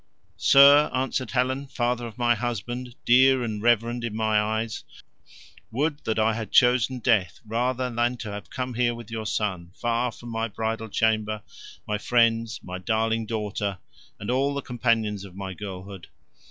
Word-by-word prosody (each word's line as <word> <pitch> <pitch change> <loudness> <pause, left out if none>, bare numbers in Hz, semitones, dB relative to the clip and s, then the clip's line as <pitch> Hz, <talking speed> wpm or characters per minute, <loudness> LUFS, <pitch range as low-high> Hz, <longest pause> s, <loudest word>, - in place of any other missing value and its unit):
"Sir," 140 +2 +7
answered 130 -1 -1
Helen, 130 +2 0
"father 120 -1 -1
of 115 0 -12
my 120 -1 +3
husband, 120 +1 -4
dear 130 +1 +5
and 110 -3 -3
reverend 120 +1 +2
in 115 -3 -3
my 110 -1 +2
eyes, 110 0 -2 0.9
would 145 +5 -1
that 110 - -1
I 110 0 +3
had 110 -1 -5
chosen 125 0 +4
death 105 - +1
rather 125 +3 -1
than 120 +1 0
to 110 -3 -6
have 105 0 -8
come 130 -1 -4
here 120 0 +1
with 115 -1 -10
your 110 -1 -4
son, 90 -6 -2
far 120 +1 0
from 120 +1 -11
my 115 0 -2
bridal 110 +1 -3
chamber, 110 0 0 0.4
my 105 0 -1
friends, 115 -1 +2
my 90 0 -6
darling 110 +2 0
daughter, 105 -3 -3 0.4
and 100 - -3
all 140 +3 +1
the 140 - -3
companions 110 -4 0
of 95 -2 -12
my 95 -1 -5
girlhood. 95 -1 -8
115 Hz, 165 wpm, -25 LUFS, 105-125 Hz, 0.9 s, Sir